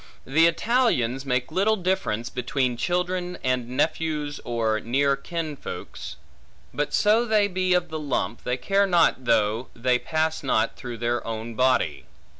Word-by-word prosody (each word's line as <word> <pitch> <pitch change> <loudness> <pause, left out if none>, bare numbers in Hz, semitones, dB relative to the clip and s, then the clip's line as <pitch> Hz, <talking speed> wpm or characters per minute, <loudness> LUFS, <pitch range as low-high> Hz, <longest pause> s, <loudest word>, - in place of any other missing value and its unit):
The 160 +5 +4
Italians 165 - +1
make 125 +2 0
little 200 +6 +2
difference 180 - -1
between 125 0 -1
children, 180 +5 -1
and 125 -2 0
nephews 150 +1 -1
or 115 -2 0
near 140 +5 +1
kinsfolks; 160 -2 -6 0.6
but 145 - -1
so 215 +3 +4
they 215 -3 +3
be 185 -1 +1
of 175 -1 0
the 160 0 -4
lump, 140 -5 -2
they 125 +1 -1
care 195 +8 +2
not 170 -8 +3
though 115 0 +2
they 125 +1 +1
pass 160 +2 -1
not - - +1
through 120 -3 -7
their 120 +1 -1
own 115 +1 -4
body. 125 - +1
140 Hz, 145 wpm, -25 LUFS, 120-180 Hz, 0.6 s, The